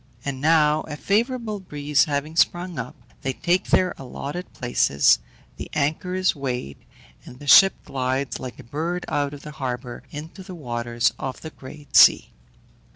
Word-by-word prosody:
And 135 -2 -4
now 155 -1 +4
a 150 -1 -6
favourable 225 - 0
breeze 150 -4 +1
having 150 +1 -3
sprung 175 -2 +1
up, 120 +1 -6 0.3
they 135 - -2
take 175 +7 +1
their 185 -1 +3
allotted 140 +6 -6
places, 120 - +3 0.4
the - - -7
anchor 155 +5 -1
is 185 -1 +2
weighed, 125 - -4 0.4
and 125 - -12
the 145 - -11
ship 195 +7 +8
glides 130 0 -2
like 130 -1 -7
a - - -11
bird 165 +8 -3
out 145 0 -1
of 140 - -13
the 150 - -8
harbour 125 -3 -5
into 155 +6 -9
the 185 -1 -9
waters 120 -5 -1
of 130 -1 -5
the 160 - -8
great 145 +2 -12
sea. - - +7
145 Hz, 160 wpm, -23 LUFS, 130-175 Hz, 0.4 s, ship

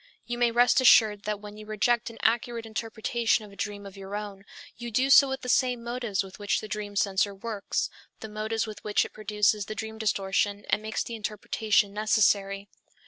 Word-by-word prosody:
You 240 0 -4
may 240 -1 +4
rest 245 +3 +4
assured 215 -5 +5
that 210 -1 -2
when 210 0 -10
you 215 0 -11
reject 235 +3 +1
an 230 - -12
accurate 230 0 +1
interpretation 225 0 -1
of 205 - -14
a - - -14
dream 205 0 -5
of 195 -1 -10
your 195 +1 -7
own, 205 -2 -6 0.3
you 240 0 -6
do 255 +5 +1
so 275 0 +8
with 265 0 -3
the 250 - -7
same 250 -1 +2
motives 235 -4 -2
with 190 +1 -12
which 205 0 0
the 215 - -7
dream 210 -1 -5
censor 200 0 +1
works, 210 0 -2 0.3
the 220 - -7
motives 215 +1 -2
with 215 -1 -9
which 210 -1 +1
it - - -11
produces 210 -1 +1
the 215 - -5
dream 220 0 -6
distortion 200 -1 0
and - - +2
makes 220 0 -2
the 235 - -7
interpretation 215 -1 0
necessary. 200 -2 +2
215 Hz, 200 wpm, -27 LUFS, 205-230 Hz, 0.3 s, so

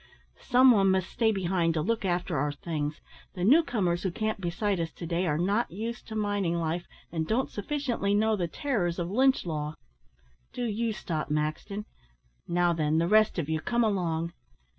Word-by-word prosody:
"Some 255 +1 +6
one 195 -4 +4
must 190 -1 +1
stay 225 -2 +2
behind 175 -4 0
to 155 - +1
look 225 +5 0
after 175 -1 -1
our 145 +1 0
things. 150 0 -4 0.3
The 180 - -3
new 275 - +7
comers 190 - 0
who 190 - 0
camped 215 +3 -2
beside 185 +2 -1
us 165 -1 -2
to 170 - -7
day 175 +2 0
are 150 -2 +1
not 200 +7 +1
used 230 +6 -5
to 220 - -6
mining 205 -5 0
life, 170 +1 -2 0.2
and 160 -2 -2
don't 250 +4 0
sufficiently 230 -3 -1
know 220 +1 +3
the 180 -4 -1
terrors 175 - -1
of 175 +1 -3
Lynch 265 +2 +3
law. 150 -2 -3 0.8
Do 245 0 -2
you 225 +1 -1
stop, 165 -7 -3
Maxton. 155 +8 -2 0.6
Now 175 0 +2
then, 155 -1 +1
the 165 +1 +2
rest 215 +1 +4
of 165 -4 -1
you, 160 0 0
come 240 +4 +1
along." 170 -5 0
185 Hz, 185 wpm, -28 LUFS, 165-220 Hz, 0.8 s, new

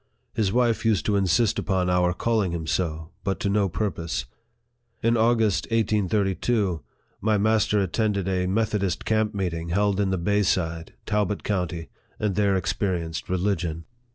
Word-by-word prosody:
His 105 -4 +1
wife 120 0 +2
used 110 -4 +2
to 105 - +1
insist 100 +3 +2
upon 95 -3 0
our 90 -1 +3
calling 105 -1 0
him 80 -2 -3
so, 80 -1 -2
but 95 -3 -1
to 100 - 0
no 100 -1 +2
purpose. 85 -4 -2 0.8
In 115 +1 +3
August, 115 -3 +2
1832, 105 -3 +1 0.4
my 110 +1 +2
master 105 0 +2
attended 100 0 0
a 90 -1 0
Methodist 100 -2 0
camp 110 -1 +1
meeting 85 -4 -2
held 100 +2 +1
in 100 -2 +2
the 95 - 0
Bay 100 +4 +1
side, 85 -4 -1
Talbo? 105 -2 0
county, 90 -4 -2 0.3
and 105 -2 0
there 100 0 +2
experienced 90 -3 -2
religion. 90 -3 -1
100 Hz, 150 wpm, -25 LUFS, 90-105 Hz, 0.8 s, our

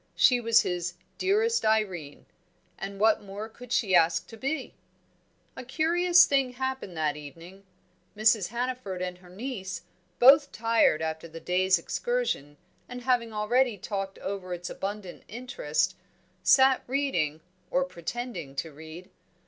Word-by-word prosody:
She 250 -2 +5
was 230 0 +5
his 175 -1 -3 0.2
"Dearest 435 +5 +2
Irene"; 190 -9 -1 0.5
and 195 0 -7
what 220 +1 +4
more 205 +2 -7
could 240 +2 -14
she 210 -7 +1
ask 170 -1 +4
to 225 - -10
be? 275 +8 -3 0.8
A - - -7
curious 345 +6 +4
thing 270 -3 +1
happened 260 -8 -4
that 150 -2 0
evening. 165 +7 -12 0.5
Mrs. 215 -3 +4
Hannaford 240 -6 -3
and 180 0 -5
her 180 -1 -17
niece, 190 -4 -6 0.3
both 280 - +7
tired 225 -8 +2
after 160 +1 -4
the 165 0 -10
day's 185 +2 +2
excursion, 170 - -2 0.3
and 250 0 -7
having 240 -2 +1
already 225 +2 +1
talked 195 0 -4
over 190 -2 -4
its 175 +1 -7
abundant 200 -2 -6
interests, 255 - -2 0.5
sat 265 -1 +5
reading, 255 - -1 0.3
or 270 - +2
pretending 175 - -6
to 160 +3 -4
read. 160 +4 -11
210 Hz, 135 wpm, -28 LUFS, 175-255 Hz, 0.8 s, both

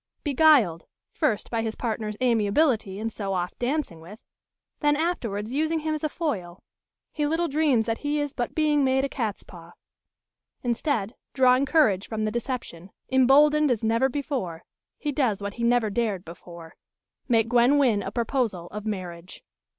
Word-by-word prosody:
Beguiled, 275 - +4 0.2
first 210 - -1
by 230 -1 0
his 225 -1 -3
partner's 215 -3 -3
amiability 225 -2 +2
in 225 +2 -3
so 200 -3 -4
oft 180 0 -3
dancing 245 - -2
with, 185 +6 -11 0.6
then 295 -1 +2
afterwards 235 - -2
using 315 +2 0
him 310 0 -1
as 310 - -4
a 310 - 0
foil, 190 - -4 0.5
he 295 -1 -1
little 330 +3 0
dreams 280 -6 +2
that 225 -1 -2
he 295 +1 -1
is 290 -1 -2
but 240 -2 -4
being 300 -2 +2
made 265 0 +2
a - - -1
catspaw. 190 -9 -6 0.9
Instead, 240 -3 -1 0.2
drawing 260 +1 +4
courage 225 - +3
from 220 -1 -2
the 215 - -1
deception, 235 -7 -5 0.2
emboldened 290 +3 +5
as 235 -3 0
never 230 +4 +2
before, 260 - -4 0.3
he 295 - -3
does 255 -8 0
what 200 0 -5
he 235 - -5
never 235 -2 +2
dared 205 -4 -1
before 170 0 -11 0.5
make 230 -3 +3
Gwen 245 +4 +4
Wynn 240 -8 +3
a 195 - -4
proposal 225 -6 -2
of 210 +1 -6
marriage. 180 -4 -6
235 Hz, 160 wpm, -25 LUFS, 205-285 Hz, 0.9 s, emboldened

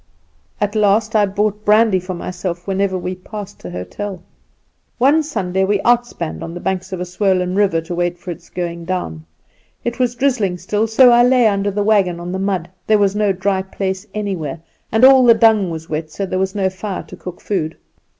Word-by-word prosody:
At 205 0 0
last 215 +1 +2
I 210 -1 +4
bought 210 +1 -1
brandy 210 -2 +4
for 185 0 -6
myself 175 0 -5
whenever 195 -1 0
we 180 0 -4
passed 200 +2 -9
an 90 - -6
hotel. 180 - -6 0.7
"One 280 +6 +4
Sunday 190 - -1
we 200 +1 +1
outspanned 240 -9 0
on 165 +1 -6
the - - -5
banks 190 +1 -3
of 185 - -4
a 180 - -3
swollen 180 0 0
river 190 -5 +2
to 165 +2 -6
wait 175 0 -1
for 175 +1 -7
its 170 - -10
going 170 -1 -4
down. 80 - -4 0.6
It 240 +2 -3
was 245 -1 +1
drizzling 235 -8 0
still, 210 +4 -1
so 245 +3 +6
I 240 0 +6
lay 250 0 +4
under 200 -1 +2
the 205 +1 -1
wagon 195 -5 +2
on 175 +1 -5
the 190 - -3
mud. 190 -3 -1 0.2
There 215 - +5
was 200 -1 +2
no 210 -1 +2
dry 190 +1 0
place 190 +1 -4
anywhere; 185 -8 -3 0.3
and 220 +3 +5
all 265 -1 +8
the 235 -2 +7
dung 220 -4 +4
was 160 -1 -6
wet, 155 0 -4
so 195 +5 -4
there 185 0 -2
was 190 +1 -1
no 195 -2 +1
fire 190 +1 -5
to - - -12
cook 180 -1 -9
food. 165 -6 -3
195 Hz, 205 wpm, -18 LUFS, 180-215 Hz, 0.7 s, all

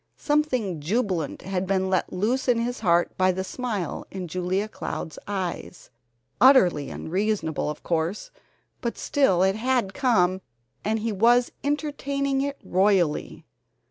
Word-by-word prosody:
Something 255 - 0
jubilant 185 - -1
had 190 -1 -2
been 190 0 +1
let 185 -1 0
loose 225 +9 0
in 245 -2 +4
his 240 +2 -2
heart 175 -4 +2
by 185 0 +4
the 190 +1 -3
smile 210 -3 -4
in 185 -2 -6
Julia 185 +4 -1
Cloud's 160 -6 -6
eyes, 185 -5 -5 0.5
utterly 185 - +5
unreasonable, 185 -4 -1
of 150 - -6
course, 170 +4 -2 0.5
but 235 - -3
still 230 - +2
it 190 +1 +2
had 240 -4 0
come, 190 -9 +2 0.4
and 220 +1 0
he 225 +1 -1
was 240 +4 +3
entertaining 280 -2 -1
it 280 0 -2
royally. 185 -5 +1
200 Hz, 135 wpm, -25 LUFS, 180-245 Hz, 0.5 s, utterly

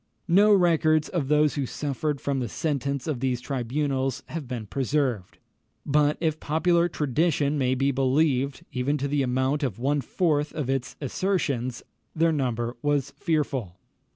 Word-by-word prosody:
No 200 +5 +5
records 165 -5 +3
of 165 -7 -1
those 150 0 +3
who 140 -3 -2
suffered 145 +1 -2
from 140 -1 -1
the 120 -3 -3
sentence 140 -2 -2
of 150 -6 -2
these 125 -1 0
tribunals 135 +1 -2
have 155 -4 -5
been 120 -3 -5
preserved; 130 -4 -1 0.5
but 150 +1 +2
if 155 -2 0
popular 170 +3 +2
tradition 150 0 +1
may 130 -2 +1
be 135 +2 +1
believed 135 0 +1
even 135 +4 0
to 140 0 -2
the 145 0 0
amount 130 +3 0
of 125 -9 -2
one 140 +4 0
fourth 150 +1 0
of 140 -4 -1
its 135 -2 -2
assertions, 140 -6 -1 0.3
their 165 +1 +3
number 120 -5 -1
was 145 -2 0
fearful. 140 - -2
140 Hz, 155 wpm, -26 LUFS, 130-155 Hz, 0.5 s, No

